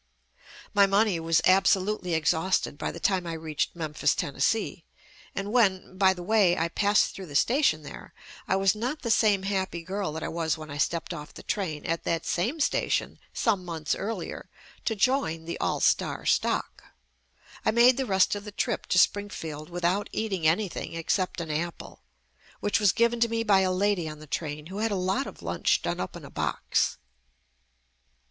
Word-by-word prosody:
My 200 -1 +6
money 200 -2 +2
was 165 0 +2
absolutely 190 -1 +3
exhausted 160 +2 +1
by - - -3
the 170 - -9
time 185 -1 +1
I 165 - -3
reached 160 -1 -3
Memphis, 155 -3 0
Tennessee, 165 +6 -1 0.5
and 195 +1 -3
when, 190 -6 +2
by 190 0 +4
the 175 - -7
way, 195 -3 +3
I 165 +1 0
passed 205 +4 +2
through 190 -2 -8
the 145 - -10
station 235 - +3
there, - - -10 0.4
I - - +2
was 195 -1 +3
not 245 +8 -4
the 235 - 0
same 210 -3 +3
happy 190 -3 -2
girl 190 -1 -3
that 160 - -5
I - - -2
was 165 -2 -1
when 155 -1 -9
I 145 - -6
stepped 170 +2 -1
off 150 0 -9
the - - -10
train 165 -8 -3
at 165 0 -1
that 165 -1 -1
same 230 - -1
station 285 - 0
some 205 -6 0
months 165 -3 -2
earlier 200 -3 -5 0.4
to 225 - 0
join 200 - +1
"The 170 - -5
All - - 0
Star - - +1
Stock." - - 0 0.8
I - - +2
made 240 +3 +6
the 265 -2 -1
rest 190 -1 +3
of 205 0 -4
the 210 - -8
trip 225 +2 -2
to - - +1
Spring 205 +2 +3
field 155 -4 -7
without 175 +3 0
eating 195 -7 -1
anything 175 +1 -1
except 180 +3 -1
an 165 -2 -4
apple, 165 +3 -5 0.6
which 205 - +1
was 205 -4 +4
given 235 +3 +2
to 235 0 +3
me 230 0 -1
by 205 -3 +4
a 190 -1 +2
lady 185 -3 +1
on 155 - -8
the 155 - -12
train 150 0 -4
who 190 +5 -7
had 225 +1 +1
a 205 - -1
lot 185 0 0
of - - -11
lunch - - +1
done - - -2
up - - -4
in - - -9
a - - -12
box. - - 0
185 Hz, 190 wpm, -27 LUFS, 165-205 Hz, 0.8 s, My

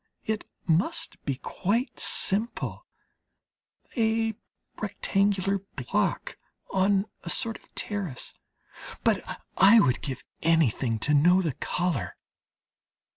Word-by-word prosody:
It 220 -1 -2 0.2
must 325 - 0
be 140 - 0
quite 210 - -2
simple: 215 +5 +1 1.1
a 225 -1 +1 0.5
rectangular 200 -1 +1 0.2
block - - -1 0.3
on 195 +1 +2 0.2
a 170 - -5
sort 225 +5 +1
of - - -25
terrace; 195 - -3 0.7
but - - +3 0.4
I 200 +5 +8
would 130 - +2
give 135 -2 -5 0.2
anything 135 -8 +2
to 150 - +2
know 175 +6 +5
the 160 -5 -1
colour. 175 -2 -2
195 Hz, 100 wpm, -27 LUFS, 160-215 Hz, 1.1 s, I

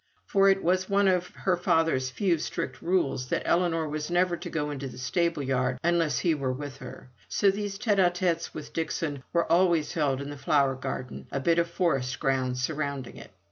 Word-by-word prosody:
For 195 0 +4
it 195 0 +2
was 185 +2 +1
one 200 0 +3
of 180 -1 +2
her 185 -2 +1
father's 165 -6 +1
few 175 +3 +1
strict 130 -4 -4
rules 140 -8 0
that - - -1
Ellinor 165 -2 +1
was 150 +1 -4
never 175 0 +2
to - - -7
go 150 -2 -2
into 140 -1 -5
the - - -10
stable 155 +4 0
yard 130 -1 0
unless 170 -2 +2
he 170 - +2
were 135 -4 -1
with 140 +1 -6
her; 125 0 -11 0.2
so 200 -1 +3
these 200 0 -4
tete 210 -2 +1
a 180 -2 +6
tetes 175 -2 -1
with 150 - -9
Dixon 155 -3 -2
were 170 -1 +2
always 170 -3 +3
held 140 -5 +1
in 140 +1 -5
the 145 - -7
flower 140 -1 +2
garden, 130 -1 -6
or 140 - -1
bit 165 +5 +2
of 170 0 +1
forest 135 -8 0
ground 130 -3 0
surrounding 140 -1 -3
it. - - -11
160 Hz, 205 wpm, -27 LUFS, 135-175 Hz, 0.2 s, a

